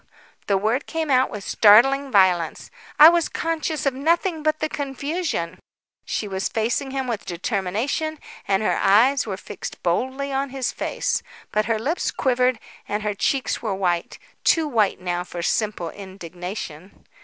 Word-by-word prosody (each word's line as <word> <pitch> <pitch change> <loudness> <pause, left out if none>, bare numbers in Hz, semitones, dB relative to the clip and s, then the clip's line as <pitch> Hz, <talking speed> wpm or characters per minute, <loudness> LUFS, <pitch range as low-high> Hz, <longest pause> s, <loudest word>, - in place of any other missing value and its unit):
The 200 - +3
word 220 +7 0
came 320 -3 -2
out 255 0 +4
with 205 -2 -7
startling 270 +9 +5
violence. 180 -5 +2 0.3
"I 300 - +11
was 340 -1 +1
conscious 320 -1 -2
of 275 - +2
nothing 325 +4 0
but 310 0 +1
the 310 - -1
confusion." 285 - -3 0.5
She 210 - -2
was 190 -1 -2
facing 235 +5 -1
him 265 0 -2
with 235 -4 -3
determination 215 - -2 0.3
and 195 +1 +2
her - - +1
eyes 245 +6 +4
were 195 -3 -3
fixed - - -8
boldly 260 +10 -1
on 270 +1 -1
his 260 -1 -2
face. - - -2 0.3
But 215 0 +1
her 225 +1 +1
lips 285 +11 -1
quivered, 255 -1 +1 0.3
and 210 +1 -2
her 210 -1 -1
cheeks 265 +6 -1
were 215 -4 -2
white, 175 -3 -1 0.3
too 325 -2 +3
white 220 -8 +1
now 175 -1 -2
for 175 -1 -6
simple 210 -5 -1
indignation. 180 -2 -8
230 Hz, 155 wpm, -23 LUFS, 195-280 Hz, 0.5 s, I